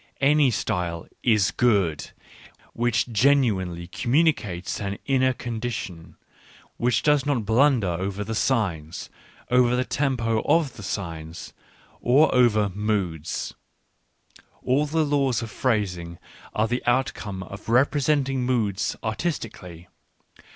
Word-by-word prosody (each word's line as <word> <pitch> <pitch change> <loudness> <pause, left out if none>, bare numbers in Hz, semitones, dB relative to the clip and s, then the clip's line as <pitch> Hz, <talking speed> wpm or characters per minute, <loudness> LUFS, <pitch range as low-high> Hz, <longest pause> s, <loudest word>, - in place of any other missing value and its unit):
Any 145 0 +4
style 90 -7 -2
is 110 -6 +3
good 100 -10 +1 0.6
which 120 0 0
genuinely 105 -9 +2
communicates 120 - 0
an 100 0 -3
inner 130 -1 +3
condition, 115 -8 -5 0.6
which 120 0 +1
does 150 -2 +3
not 135 -6 -1
blunder 125 +1 +3
over 95 +4 -2
the 110 +2 -4
signs, 95 - -1 0.4
over 125 -1 +4
the 125 +1 0
tempo 120 -7 0
of 160 -6 +1
the - - -10
signs, 85 -4 -6 0.5
or 135 +6 +4
over 110 -5 +4
moods 95 -6 -2 0.5
— - - -28
all 140 +4 +2
the 160 +1 +1
laws 140 -5 +1
of 110 - -7
phrasing 90 -8 -1 0.4
are 110 +1 +2
the 120 +2 -1
outcome 110 -6 -1
of 100 +4 -10
representing 135 +1 +2
moods 110 -6 0
artistically. 110 - -4
115 Hz, 115 wpm, -24 LUFS, 95-130 Hz, 0.6 s, Any